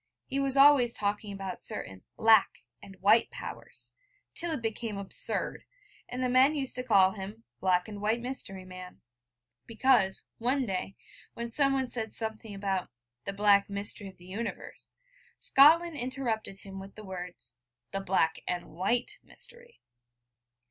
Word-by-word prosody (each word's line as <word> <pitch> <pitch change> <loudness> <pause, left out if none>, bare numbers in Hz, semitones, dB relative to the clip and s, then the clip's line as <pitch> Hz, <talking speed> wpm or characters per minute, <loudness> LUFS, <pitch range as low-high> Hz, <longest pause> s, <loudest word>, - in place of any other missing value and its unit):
He 275 - -2
was 275 0 0
always 275 -4 +6
talking 205 0 -2
about 195 -2 -6
certain 95 -1 -5 0.2
'Black' 220 - +4 0.2
and 195 - -12
'White 215 +4 +5
Powers, - - -6 0.4
till 340 - -1
it 310 -6 -2
became 225 -1 -3
absurd, 200 -1 -1 0.5
and 250 +1 -3
the - - +2
men 260 +4 +4
used 270 -3 0
to 250 - -2
call 195 -6 +5
him 205 +3 -8 0.2
'black 180 -1 +2
and 205 -2 -8
white 220 +3 +1
mystery 235 -7 -4
man,' 185 0 -11 0.7
because, 230 -4 +2
one 255 +3 +1
day, 195 -1 -3 0.4
when 235 0 -5
someone 270 0 +2
said 225 -3 -3
something 220 -2 -4
about 195 -2 -2 0.4
'the 200 - -2
black 200 0 +4
mystery 200 +1 0
of 190 - -13
the 175 - -16
universe,' 210 +6 -6 0.4
Scotland 325 +4 +5
interrupted 240 -6 -3
him 195 -1 -9
with 195 +1 -11
the 215 - -10
words: 180 -9 -7 0.4
'the 195 - -2
black 180 -4 +1
and 175 -2 -3
white 195 +9 0
mystery.' 475 0 +1
215 Hz, 150 wpm, -29 LUFS, 195-250 Hz, 0.7 s, always